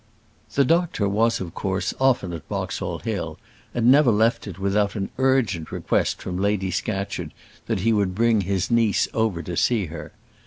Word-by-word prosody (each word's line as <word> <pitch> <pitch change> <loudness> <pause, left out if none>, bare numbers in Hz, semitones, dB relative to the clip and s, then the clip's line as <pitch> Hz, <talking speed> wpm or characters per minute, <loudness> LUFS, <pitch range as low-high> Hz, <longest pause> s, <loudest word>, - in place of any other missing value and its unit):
The 140 - +4
doctor 165 - +1
was 110 +4 +2
of 85 -3 -6
course 95 -1 -2
often 125 -9 +2
at 80 - -8
Boxall - - -3
Hill, - - -4 0.3
and 120 -2 -1
never 140 -1 +6
left 110 +1 +2
it 90 -4 -7
without 100 +1 0
an 95 -2 -3
urgent 120 - +1
request - - -1
from 90 0 -4
Lady 100 -2 0
Scatcherd 95 +2 -3 0.4
that 95 - -1
he 115 +3 +3
would 100 -4 +1
bring 115 0 +3
his 95 +2 -1
niece 115 -3 +3
over 110 -7 0
to 90 - -5
see 110 +2 +2
her. - - -8
105 Hz, 170 wpm, -23 LUFS, 95-115 Hz, 0.4 s, never